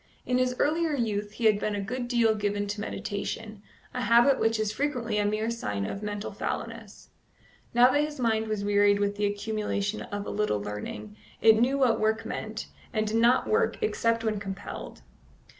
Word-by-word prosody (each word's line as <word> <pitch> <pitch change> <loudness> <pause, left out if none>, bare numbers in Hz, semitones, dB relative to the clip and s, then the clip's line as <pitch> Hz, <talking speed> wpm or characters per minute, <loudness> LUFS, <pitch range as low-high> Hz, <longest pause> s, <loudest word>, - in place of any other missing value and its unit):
In 250 0 +1
his 255 0 +1
earlier 320 +1 +1
youth 210 -4 -2
he 230 - -3
had 215 -2 +5
been 210 0 -1
a - - -2
good 240 +5 -3
deal 235 -2 +3
given 205 -1 -1
to 205 +1 -3
meditation, 210 +1 -4 0.3
a 250 - -2
habit 240 +3 +5
which 225 0 +2
is 215 -1 0
frequently 235 -4 -1
a 205 - +1
mere 215 +2 0
sign 105 - -3
of 195 - -5
mental 205 0 -4
fallowness; 225 +1 -6 0.7
now 245 +1 +7
that 290 - +3
his 300 -1 -5
mind 220 -2 +1
was 215 -2 -2
wearied 205 0 +4
with 205 0 0
the 205 0 +1
accumulation 205 0 -2
of 205 -1 -5
a - - -4
little 210 - 0
learning, 105 0 -6 0.2
it 220 -1 +6
knew 265 +3 +3
what 255 -4 +3
work 220 +1 +1
meant, 220 -1 -5 0.3
and 215 0 0
did 215 +1 0
not 240 +2 +4
work 450 +1 +2
except 230 - +1
when 215 -2 0
compelled. 195 -1 -7
220 Hz, 190 wpm, -28 LUFS, 205-235 Hz, 0.7 s, now